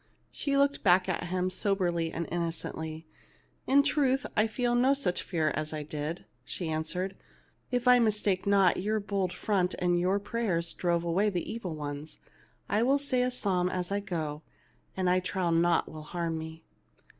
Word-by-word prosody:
She 280 -1 -1
looked 280 0 +2
back 185 -1 +4
at 180 -1 -1
him 185 +1 -1
soberly 175 -5 0
and 170 0 -3
innocently. 160 -1 -4 0.6
'/In 280 +1 +5
truth, 280 -2 +2
I 215 +1 +4
feel 240 +2 0
no 255 +3 +4
such 245 -11 0
fear 160 -4 0
as 155 +1 -3
I 155 -1 -3
did," 150 +3 -5 0.2
she 165 +5 -4
an 155 0 0
swered. 180 +4 -3 0.6
"If 245 0 -1
I 250 0 +8
mistake 210 -4 +1
not, 195 -3 +4
your 215 +3 0
bold 200 -3 -1
front 185 -3 0
and 175 -1 +2
your 185 +3 +2
prayers 200 -6 -1
drove 170 -1 0
away 185 +5 +2
the 180 -4 -3
evil 195 -8 -4
ones. 150 +1 -6 0.5
I 210 +3 +1
will 270 +4 +4
say 275 -3 0
a 250 - +2
psalm 190 -7 0
as 180 0 -3
I 200 - +1
go, 160 -7 -4 0.6
and 185 -1 +1
I 180 +1 +4
trow 185 -1 -1
naught 170 +1 +3
will 155 - -8
harm 165 +1 -3
me." 160 0 -8
185 Hz, 180 wpm, -29 LUFS, 165-215 Hz, 0.6 s, I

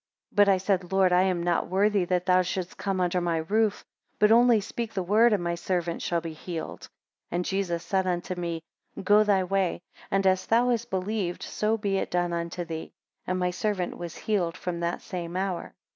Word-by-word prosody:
36 - - -28
But 205 -1 +6
I 195 - +5
said, 185 -1 -1
Lord, 190 -1 +4
I 180 - +5
am 185 -2 +1
not 175 -1 +1
worthy 200 0 +2
that 180 0 0
thou 185 0 +5
shouldst 180 0 -3
come 195 -1 -2
under 180 0 +1
my 170 -1 0
roof; 205 +6 0 0.3
but 210 +1 +4
only 235 0 +6
speak 225 +2 -5
the 190 - 0
word, 220 +6 +4
and 200 -4 +1
my 170 0 0
servant 170 -1 -2
shall 170 -1 0
be 165 -1 -6
healed. 160 0 -6 0.5
37 - - -4
And 175 0 0
Jesus 185 -4 -1
said 190 -1 0
unto 180 +1 -1
me, 170 -2 -4 0.4
Go 205 +2 +5
thy 200 -3 +3
way; 185 -1 0 0.3
and 195 0 +1
as 185 0 +2
thou 240 +2 +3
hast 235 -1 0
believed 190 -1 -2
so 215 +1 0
be 200 -2 -1
it - - -2
done 175 -1 0
unto 170 +1 -3
thee. 160 -1 -6 0.4
And 185 - 0
my 180 0 0
servant 185 -1 -2
was 175 -2 -7
healed 180 -6 -1
from 175 -1 -4
that 170 0 -2
same 175 -1 -5
hour. 190 -2 -3
185 Hz, 210 wpm, -27 LUFS, 175-200 Hz, 0.5 s, But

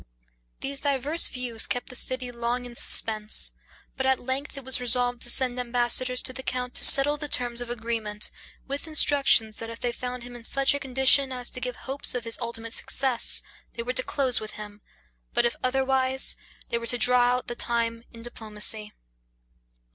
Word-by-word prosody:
These 275 +1 -5
diverse 285 +3 0
views 245 -3 -1
kept 245 - -5
the 250 - -8
city 255 -1 -1
long 240 +1 -5
in 240 -1 -13
suspense; 215 -2 +2 0.4
but 265 0 -4
at 265 0 0
length 265 +3 -7
it 275 - -9
was 260 -1 +5
resolved 245 0 -1
to 240 - 0
send 250 0 +3
ambassadors 245 +1 +2
to 255 - +3
the 260 - -9
count 250 -1 -6
to - - +2
settle 290 +2 +10
the 295 0 -5
terms 245 -3 -1
of 240 - -7
agreement, 225 -3 -2 0.4
with 280 +4 -7
instructions, 280 -8 +2
that 230 - -8
if 230 0 -11
they 245 - -3
found 250 0 -8
him 245 0 -13
in 240 - -12
such 275 +4 0
a 285 - -4
condition 265 0 +2
as 250 -1 -5
to 250 - -8
give 250 -1 -6
hopes 270 +1 -4
of 245 - -4
his 230 0 -1
ultimate 230 -1 -7
success, 260 -3 0 0.3
they 235 - -6
were 250 +2 -5
to 255 - 0
close 260 -2 +1
with 215 0 -10
him, 210 -1 -12 0.5
but, - - +2
if 235 - -2
otherwise, 265 0 0 0.3
they 235 - -3
were 235 - -8
to 245 - 0
draw 245 0 +3
out 250 - -6
the 240 - -7
time 230 -1 -3
in 230 -1 -14
diplomacy. 215 -2 +1
245 Hz, 195 wpm, -23 LUFS, 235-265 Hz, 0.5 s, settle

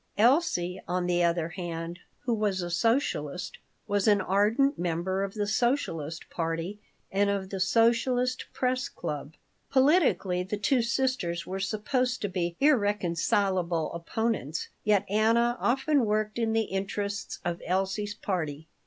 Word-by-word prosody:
Elsie, 215 - +2
on 180 +1 0
the 175 0 +2
other 170 -1 +1
hand, 170 0 -5 0.2
who 245 - 0
was 205 -4 0
a 175 - -4
socialist, 180 - 0 0.3
was 205 -1 +1
an 205 -1 +5
ardent 210 +9 +2
member 175 +2 -1
of 195 +1 -4
the 210 -1 0
Socialist 205 - -1
party 165 +4 -3 0.3
and 200 +1 +2
of 195 -1 -2
the 195 - -3
Socialist 240 +5 +2
Press 255 +1 -1
Club. 150 0 -5 0.3
Politically 265 - +3
the 190 +3 -3
two 245 +5 +2
sisters 235 -8 -1
were 190 +1 -4
supposed 250 +6 0
to 205 - 0
be 175 -2 -2
irreconcilable 190 - +1
opponents, 170 - -2
yet 210 -2 +3
Anna 230 +4 +3
often 270 +2 +2
worked 215 +1 0
in 225 -1 +1
the 225 - +3
interests 200 0 -3
of 175 -1 -2
Elsie's 195 +3 -1
party. 160 -7 -3
200 Hz, 135 wpm, -28 LUFS, 175-230 Hz, 0.3 s, an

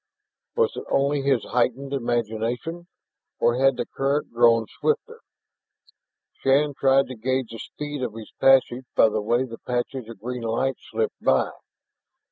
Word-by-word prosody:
Was 470 0 +2
it - - -5
only 140 +1 +2
his 135 -4 +2
heightened 130 +3 -1
imagination, 120 +7 -2 0.5
or 120 +1 +2
had 135 -1 +4
the - - -1
current 140 +2 -1
grown 115 -1 +4
swifter? - - -1 1.2
Shann 145 +2 +3
tried 135 0 +3
to 130 - -6
gauge 130 +1 -1
the 115 - -8
speed 145 -2 -6
of 120 -4 -3
his 110 -1 -9
passage 130 -1 +4
by 110 - +6
the 110 - -1
way 120 +4 +1
the 115 -2 -9
patches 125 -1 -3
of 115 - -10
green 125 +1 -5
light 115 +3 -1
slipped 110 -3 -3
by. 65 -1 +3
125 Hz, 150 wpm, -24 LUFS, 115-135 Hz, 1.2 s, by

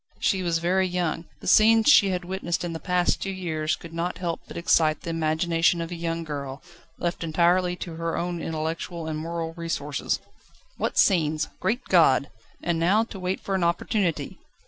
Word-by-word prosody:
She 190 - +1
was 170 -2 +1
very 185 +3 +1
young: 175 -2 -2 0.2
the - - -8
scenes 220 +3 +6
she 205 -9 +7
had 180 -1 -2
witnessed 180 -2 -2
in 175 -1 -3
the 165 - -5
past 180 0 +1
two 195 - -2
years 160 -5 -2
could 165 -1 -12
not 170 +2 -2
help 170 -2 -3
but - - -9
excite 160 -2 +3
the 170 - -4
imagination 165 +1 +1
of 165 +1 -4
a - - -3
young 165 0 -3
girl, 140 -3 -6 0.3
left 175 0 -2
entirely 175 +2 +2
to 170 -2 -7
her 165 0 -2
own 175 -1 -2
intellectual 160 +2 -4
and 155 -1 -3
moral 165 0 -4
resources. 155 -4 -2 0.6
What - - -2
scenes! 160 -4 +3
Great 245 +3 -1
God! 145 -6 +4 0.3
And 170 -1 0
now 195 +7 +3
to 220 -4 -9
wait 185 +1 -2
for 195 - -3
an 190 -2 +1
opportunity! 170 +1 -1
170 Hz, 185 wpm, -25 LUFS, 165-180 Hz, 0.6 s, she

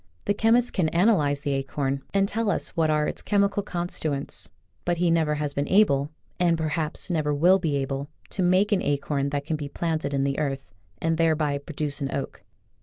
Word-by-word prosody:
The 205 - +2
chemist 230 +3 +3
can 175 -5 +1
analyze 170 -6 +2
the 145 -2 -1
acorn, 135 0 -2
and 195 0 +2
tell 225 +1 -1
us - - 0
what 160 -2 0
are 150 0 +2
its - - -4
chemical 200 0 +1
constituents, 165 -6 -3 0.3
but 175 -1 0
he 175 0 +2
never 160 -2 +2
has 145 -1 -2
been 140 +1 -1
able, 150 -9 +4 0.3
and 170 -2 +3
perhaps 160 +3 -2
never 150 -3 0
will 180 +6 +5
be 160 -5 -1
able, 135 0 -2 0.2
to 195 - -1
make 185 +4 +3
an 200 - +3
acorn 140 0 -1
that 140 0 -3
can 155 0 -1
be 145 -1 -5
planted 160 -1 -2
in 135 -1 0
the 140 +1 -1
earth 140 -2 -2 0.4
and 165 0 0
thereby 155 -3 +2
produce 145 -1 -4
an 135 - -1
oak. 140 - -4
155 Hz, 195 wpm, -25 LUFS, 140-180 Hz, 0.4 s, will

